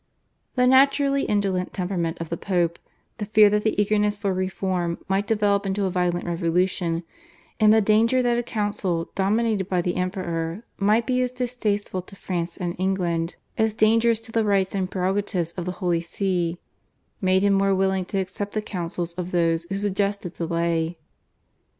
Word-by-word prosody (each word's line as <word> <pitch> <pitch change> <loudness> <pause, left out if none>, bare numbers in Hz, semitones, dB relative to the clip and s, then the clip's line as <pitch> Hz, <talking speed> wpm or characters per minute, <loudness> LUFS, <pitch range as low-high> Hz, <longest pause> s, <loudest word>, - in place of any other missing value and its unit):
The 250 -1 +3
naturally 275 +2 +4
indolent 195 -3 0
temperament 180 -3 -2
of 165 -1 -5
the 170 - -1
Pope, 170 -2 0 0.4
the 210 - -2
fear 210 0 +6
that 210 0 +2
the 220 - 0
eagerness 210 0 +2
for 200 -2 -1
reform 185 -2 -1
might 195 +1 0
develop 205 -2 +2
into 195 0 -1
a 190 - -1
violent 175 -1 0
revolution, 170 0 0 0.6
and 215 -1 +6
the 220 0 +5
danger 225 +5 +3
that 240 -1 +2
a 240 - +1
council 205 -7 -2
dominated 205 0 +1
by 180 - +1
the 175 0 -1
Emperor 180 0 -3 0.2
might 215 +3 +3
be 255 -1 +1
as 250 -1 0
distasteful 235 -6 -2
to 190 +2 -14
France 175 -3 -4
and 175 -1 -3
England 175 -3 -1 0.2
as 220 -1 +2
dangerous 225 +1 +3
to 225 - -11
the 225 0 +2
rights 195 -2 +1
and 190 -2 -1
prerogatives 190 -2 -1
of 175 0 -5
the 180 - -3
Holy 175 -2 0
See, 175 -1 -1 0.6
made 190 0 +3
him 200 0 +4
more 195 0 +3
willing 190 -1 +1
to 195 - -4
accept 195 +2 -3
the 215 - -1
counsels 175 -3 -4
of 180 0 -5
those 165 -2 +1
who 195 - -2
suggested 200 -2 -1
delay. 170 0 -1
190 Hz, 170 wpm, -24 LUFS, 175-210 Hz, 0.6 s, fear